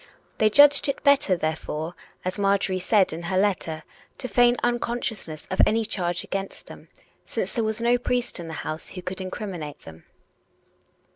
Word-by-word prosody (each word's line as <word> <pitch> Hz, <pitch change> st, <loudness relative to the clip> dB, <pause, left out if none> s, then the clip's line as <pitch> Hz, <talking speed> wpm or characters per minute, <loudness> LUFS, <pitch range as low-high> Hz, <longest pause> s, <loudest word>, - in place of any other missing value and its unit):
They 215 Hz, -, +5 dB
judged 285 Hz, +4 st, +7 dB
it 275 Hz, -, -3 dB
better, 280 Hz, -9 st, +4 dB
therefore, 160 Hz, 0 st, -3 dB, 0.3 s
as 185 Hz, +3 st, -3 dB
Marjorie 195 Hz, -1 st, +1 dB
said 190 Hz, 0 st, +2 dB
in 165 Hz, -, -5 dB
her 185 Hz, -, 0 dB
letter, 180 Hz, -5 st, 0 dB, 0.3 s
to 255 Hz, -, -3 dB
feign 245 Hz, -1 st, +4 dB
unconsciousness 235 Hz, -9 st, -2 dB
of 190 Hz, -, +3 dB
any 225 Hz, 0 st, +1 dB
charge 175 Hz, -4 st, -2 dB
against 195 Hz, 0 st, -5 dB
them, -, -, -13 dB, 0.4 s
since -, -, -3 dB
there 235 Hz, -, 0 dB
was 220 Hz, 0 st, -1 dB
no 240 Hz, +1 st, +3 dB
priest 245 Hz, -3 st, -2 dB
in 170 Hz, -, -7 dB
the 160 Hz, -, -6 dB
house 155 Hz, +1 st, -4 dB
who 180 Hz, -, -7 dB
could 185 Hz, +1 st, -5 dB
incriminate 185 Hz, -5 st, -6 dB
them. 80 Hz, 0 st, -13 dB
195 Hz, 165 wpm, -25 LUFS, 175-235 Hz, 0.4 s, judged